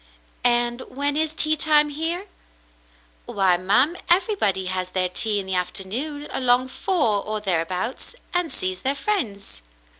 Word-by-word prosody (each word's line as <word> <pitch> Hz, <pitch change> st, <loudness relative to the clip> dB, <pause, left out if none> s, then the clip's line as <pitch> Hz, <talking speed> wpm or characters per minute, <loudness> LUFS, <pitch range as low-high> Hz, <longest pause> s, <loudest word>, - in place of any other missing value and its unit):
"And 240 Hz, 0 st, +2 dB
when 285 Hz, +2 st, 0 dB
is 315 Hz, 0 st, 0 dB
tea 310 Hz, 0 st, +3 dB
time 300 Hz, -1 st, +4 dB
here?" 325 Hz, +6 st, -2 dB, 1.0 s
"Why, 190 Hz, -3 st, +2 dB
ma'm, 250 Hz, -, +3 dB
everybody 345 Hz, -, +2 dB
has 185 Hz, 0 st, -3 dB
their 185 Hz, -1 st, -1 dB
tea 210 Hz, +3 st, 0 dB
in 195 Hz, -, -4 dB
the 190 Hz, -, -3 dB
afternoon 230 Hz, -, -2 dB
along 255 Hz, 0 st, +2 dB
four 265 Hz, -, 0 dB
or 215 Hz, 0 st, -3 dB
thereabouts, 185 Hz, -, -2 dB, 0.2 s
and 355 Hz, -2 st, 0 dB
sees 185 Hz, 0 st, -4 dB
their 270 Hz, +2 st, 0 dB
friends." 240 Hz, -, -3 dB
245 Hz, 140 wpm, -23 LUFS, 190-305 Hz, 1.0 s, time